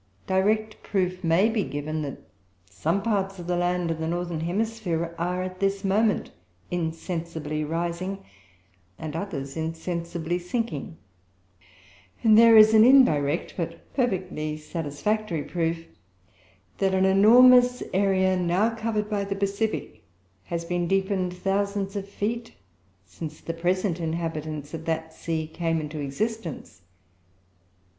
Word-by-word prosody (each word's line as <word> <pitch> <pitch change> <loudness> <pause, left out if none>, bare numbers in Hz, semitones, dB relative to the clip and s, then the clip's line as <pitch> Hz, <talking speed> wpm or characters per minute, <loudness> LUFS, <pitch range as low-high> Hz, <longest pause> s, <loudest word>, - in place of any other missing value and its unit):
Direct 215 +3 +1
proof 185 -2 -1
may 170 +5 +4
be 225 -2 0
given, 145 +2 -4
that 140 -3 -5 0.5
some 165 - -1
parts 195 -3 0
of 175 - -8
the 180 0 0
land 175 -1 0
of 160 - -3
the 160 - -2
northern 175 -1 -2
hemisphere 175 -2 -2
are 180 +2 -1
at 185 0 -6
this 195 0 0
moment 210 +2 +1 0.4
insensibly 165 -2 -3
rising 170 +5 -3 0.7
and 155 -1 -6
others 150 -7 -4
insensibly 170 +1 -3
sinking; 190 -2 -3 1.3
and 220 -1 +6
there 230 0 +8
is 215 0 +8
indirect, 215 - +5
but 165 -1 -6
perfectly 185 - -1
satisfactory, 165 +4 -2
proof, 165 +1 -2 0.9
that 190 -1 +2
an 190 0 +3
enormous 245 +5 +6
area 190 -1 +3
now 180 +5 +1
covered 220 -2 -2
by 205 -2 -1
the 195 0 -3
Pacific 200 +2 -2 0.4
has 170 0 -4
been 175 0 -1
deepened 190 -1 0
thousands 195 +2 -1
of 200 0 -4
feet, 230 +4 -3 0.5
since 155 - -8
the 165 - -5
present 180 +1 0
inhabitants 160 -3 -4
of 160 0 -6
that 160 0 -2
sea 160 -1 -3
came 165 +1 -1
into 155 0 -5
existence. 170 - -4
180 Hz, 125 wpm, -26 LUFS, 165-200 Hz, 1.3 s, there